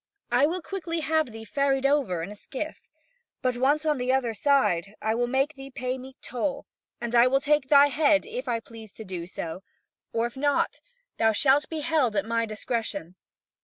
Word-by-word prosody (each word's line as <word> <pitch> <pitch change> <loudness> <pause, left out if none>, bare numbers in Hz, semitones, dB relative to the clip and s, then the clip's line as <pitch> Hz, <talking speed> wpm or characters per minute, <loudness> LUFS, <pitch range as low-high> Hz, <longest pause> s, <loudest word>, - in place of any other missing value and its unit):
I 250 +4 +5
will 350 +2 -3
quickly 335 -4 -3
have 315 +1 +1
thee 225 0 -9
ferried 275 +3 +1
over 270 - +2
in 195 - -6
a - - -8
skiff. 280 +8 -6 0.6
But 255 -1 +1
once 290 +5 +2
on 300 -3 +1
the 250 +1 +1
other 255 -3 +1
side, 210 -7 +2
I 220 +1 0
will 240 +1 0
make 270 +4 +1
thee 270 -2 -10
pay 255 0 -3
me 260 +1 -11
toll, 255 +3 -3 0.3
and 235 0 -4
I 240 +1 +6
will 270 +1 +3
take 290 -1 +2
thy 285 0 +7
head, 295 +1 +3
if 470 +3 -6
I 230 -1 0
please 225 -2 -12
to 220 - -9
do 180 -3 -5
so, 170 0 -6 0.5
or 230 0 0
if 240 - -5
not, 285 +1 +1 0.4
thou 225 0 +4
shalt 275 +6 +3
be 320 -2 -3
held 295 -8 +1
at 200 0 +1
my 230 0 0
discretion." 215 -5 -3
260 Hz, 200 wpm, -26 LUFS, 225-290 Hz, 0.6 s, thy